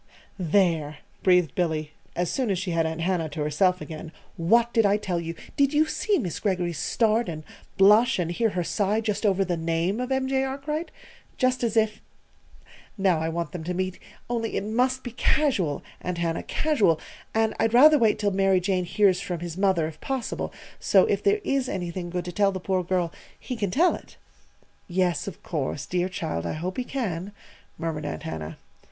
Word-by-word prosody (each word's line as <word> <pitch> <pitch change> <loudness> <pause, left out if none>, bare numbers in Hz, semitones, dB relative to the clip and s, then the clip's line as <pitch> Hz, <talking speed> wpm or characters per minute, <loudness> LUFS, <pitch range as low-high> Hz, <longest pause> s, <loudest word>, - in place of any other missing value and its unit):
"There!" 165 -4 +1 0.2
breathed 180 -3 +4
Billy, 155 -4 -1 0.2
as 175 -1 0
soon 255 -4 -1
as 195 - +1
she 185 0 -3
had 165 -1 +1
Aunt 160 +1 -4
Hannah 170 -2 0
to 150 +1 -5
herself 180 +5 +2
again. 160 0 -7 0.2
"What 230 +8 +3
did 225 - +4
I 200 0 +4
tell 185 -4 -2
you? 165 0 -5 0.2
Did 280 0 +3
you 305 +1 +5
see 405 +5 0
Miss 180 - -3
Greggory's 180 -6 -1
start 225 +2 +1
and 155 -2 -6 0.3
blush 215 +5 +6
and 175 -2 -1
hear 225 +6 +1
her 180 -3 -2
sigh 205 +4 0
just 215 -1 0
over 195 -1 +2
the 175 -2 -1
name 165 +5 0
of 250 +1 -3
M. 265 0 +1
J. 265 0 +1
Arkwright? 280 +5 -3 0.5
Just 255 -1 +1
as 230 -1 0
if! 215 -1 +2 1.0
Now 190 -4 +2
I 160 +1 -1
want 170 +1 -3
them 175 -4 -6
to 180 +2 -3
meet; 185 0 -2 0.3
only 230 -2 -2
it - - -1
must 250 +5 0
be 245 - -5
casual, 225 - +1 0.2
Aunt 180 -1 -3
Hannah 170 -1 -1
casual! 220 - +2 0.4
And 220 0 +2
I'd 225 +1 +2
rather 300 +4 +8
wait 220 -2 +3
till 205 -1 0
Mary 195 -1 +3
Jane 180 0 0
hears 190 0 +3
from 175 -2 -4
his 170 -2 -5
mother, 190 -4 +2
if 155 0 -8
possible, 265 -3 -3 0.3
so - - +5
if - - 0
there 410 +1 +2
is 275 -4 0
anything 175 -1 -4
good 180 0 -3
to 180 - -4
tell 200 +2 +2
the 190 - -4
poor 185 0 0
girl, 175 -1 -1 0.3
he 255 - -5
can 205 -4 -1
tell 330 - +3
it." - - -10 0.7
"Yes, 180 0 0
of 190 - -8
course. 145 -3 -3
Dear 180 0 -1
child! 85 - -3
I - - -2
hope 175 +4 -4
he 255 - 0
can," 205 -8 -3 0.4
murmured 160 -3 -3
Aunt 80 - -5
Hannah. 80 0 -5
185 Hz, 195 wpm, -26 LUFS, 170-225 Hz, 1.0 s, rather